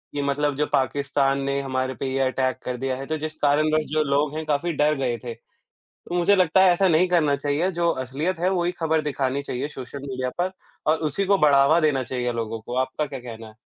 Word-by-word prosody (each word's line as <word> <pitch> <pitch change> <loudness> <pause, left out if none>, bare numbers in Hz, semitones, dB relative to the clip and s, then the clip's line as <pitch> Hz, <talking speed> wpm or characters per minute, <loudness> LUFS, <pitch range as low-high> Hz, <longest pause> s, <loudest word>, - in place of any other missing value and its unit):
कि 145 - -1
मतलब 140 0 0
जो 150 +1 +1
पाकिस्तान 140 +1 +1
ने 140 0 -1
हमारे 130 -1 -2
पे 135 - -5
ये 135 - 0
अटैक 130 -1 -1
कर 125 -1 -3
दिया 130 0 -2
है, 135 - -6
तो 155 +1 -2
जिस 155 +1 -5
कारणवश 155 +2 +2
जो 155 0 +2
लोग 145 +1 0
हैं 160 - -4
काफ़ी 155 +3 0
डर 150 +1 +2
गए 125 -3 -1
थे। 120 -2 -5 0.8
मुझे 175 +3 +4
लगता 185 0 +4
है 185 - +6
ऐसा 190 +2 +2
नहीं 170 +2 +4
करना 155 -5 +3
चाहिए, 150 +7 -1
जो 170 -1 +1
असलियत 140 +7 -3
है 180 +2 +2
वो 180 -2 0
ही 175 - 0
खबर 160 -1 +1
दिखानी 140 -2 -1
चाहिए 135 +1 -3
सोशल 135 -1 -8
मीडिया 130 -1 -3
पर 185 +1 0 0.4
और 160 - +2
उसी 195 +7 -1
को 200 0 +3
बढ़ावा 145 +1 +5
देना 145 -5 +1
चाहिए 125 0 -2
लोगों 115 -1 -4
को। 120 +3 -6
आपका 150 +4 -3
क्या 135 -2 -7
कहना 115 -2 -9
है? 110 - -15
145 Hz, 230 wpm, -24 LUFS, 130-155 Hz, 0.8 s, है